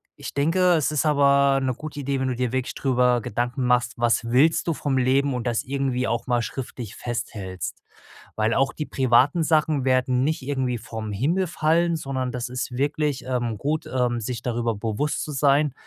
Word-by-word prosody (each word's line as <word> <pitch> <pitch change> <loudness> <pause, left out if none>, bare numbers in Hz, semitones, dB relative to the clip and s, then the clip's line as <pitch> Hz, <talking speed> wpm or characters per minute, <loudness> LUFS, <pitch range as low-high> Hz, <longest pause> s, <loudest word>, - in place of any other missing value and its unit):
ich - - -8
denke, 175 +5 +3
es 155 -2 +1
ist 150 +1 0
aber 140 -2 +4
'ne 130 -1 0
gute 150 +2 -8
Idee, 140 0 -1
wenn 130 - -1
du 130 - -1
dir 125 -1 -1
wirklich 130 0 -2
drüber 125 -2 +2
Gedanken 120 +5 -2
machst: 125 0 +2
Was 120 0 +2
willst 135 +10 +3
du 165 - +2
vom 140 -2 -1
Leben 135 +2 +2
und 125 -1 -3
das 115 -2 0
irgendwie 135 -2 -1
auch 115 +1 -2
mal 120 -1 +2
schriftlich 120 -3 -6
festhältst. 105 -7 -5 0.6
Weil 110 +1 +1
auch 135 0 +2
die 150 - -5
privaten 130 +5 +3
Sachen 155 -3 +2
werden 130 0 +2
nicht 155 +1 0
irgendwie 130 -3 -2
vom 110 -1 -6
Himmel 160 - 0
fallen, 170 +1 +1
sondern 130 -4 -3
das 125 -1 -4
ist 125 0 -4
wirklich, 145 0 -1
ähm, 120 -3 -1
gut, 150 +2 -1
ähm, 125 -2 0
sich 115 0 -4
darüber 120 -1 -1
bewusst 110 +8 -2
zu 155 - -6
sein 140 0 +2
130 Hz, 190 wpm, -24 LUFS, 120-145 Hz, 0.6 s, aber